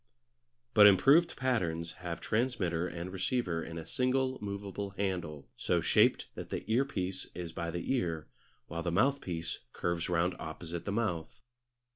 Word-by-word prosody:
But 105 -1 +9
improved 140 - +6
patterns 85 -11 0
have 85 -2 -4
transmitter 100 -8 0
and 85 +2 -6
receiver 95 -4 -1
in 80 - -7
a 80 - -6
single 130 +1 +1
movable 100 -1 -5
handle, 85 -7 -2
so - - +1
shaped - - +4
that - - -7
the - - -3
earpiece 100 -7 0
is 85 -2 -5
by 85 - -3
the 85 +9 -2
ear 85 - -1 0.4
while 85 +1 -4
the 85 - -1
mouthpiece 90 -5 0
curves 85 0 -1
round 85 +1 +2
opposite 80 +2 -6
the 100 - -2
mouth. 100 -7 -2
90 Hz, 145 wpm, -32 LUFS, 85-110 Hz, 0.4 s, But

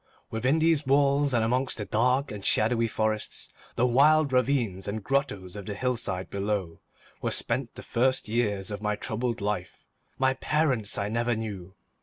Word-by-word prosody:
Within 130 +7 +1
these 160 -3 +2
walls, 140 +1 +3
and 120 -3 +2
amongst 125 +3 0
the 105 - -3
dark 125 +7 +1
and 105 -2 -7
shadowy 115 +3 +3
forests, 110 -1 -2 0.3
the 120 - +2
wild 140 +3 +4
ravines 125 -8 +1
and 105 +1 -3
grottoes 105 -10 -1
of 100 -2 -8
the 105 - -4
hillside 115 -6 -2
below, 100 -4 -2 0.4
were - - 0
spent - - -2
the - - -9
first 130 +1 +1
years 105 -3 -1
of 105 0 -5
my 105 -1 0
troubled 115 +1 -3
life. 100 -3 -3 0.4
My 130 0 +3
parents 130 -6 0
I 100 - -1
never 115 +2 0
knew. 100 -4 -6
115 Hz, 165 wpm, -27 LUFS, 105-130 Hz, 0.4 s, wild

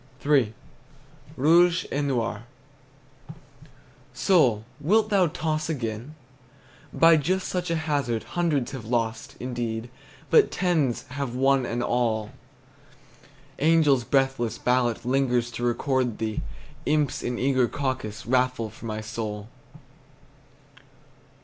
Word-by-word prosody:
III. 140 -7 +3 0.9
ROUGE 170 +5 +4
ET 145 - 0
NOIR. 120 -5 -2 1.7
Soul, 130 - +3
wilt 210 +8 +2
thou 190 -3 +4
toss 155 -1 -2
again? 120 0 -4 0.8
By 165 0 +6
just 185 +5 0
such 180 -1 -2
a 165 - +1
hazard 145 -8 -1
Hundreds 150 -7 0
have 130 -5 -7
lost, 115 -1 -2
indeed, 120 -2 -4 0.4
But 445 - +6
tens 160 -10 0
have 135 -2 -4
won 135 -1 +2
an 120 +1 -2
all. 115 -4 0 1.3
Angels' 150 -4 +4
breathless 135 -3 0
ballot 125 -2 0
Lingers 125 -2 +1
to 120 - -6
record 125 -1 0
thee; 110 -1 -2 0.5
Imps 150 -3 +1
in 120 0 -3
eager 130 -1 +2
caucus 130 -6 -4
Raffle 125 -3 0
for 115 - -10
my 110 0 -4
soul. 110 -1 -5
130 Hz, 110 wpm, -25 LUFS, 115-150 Hz, 1.7 s, By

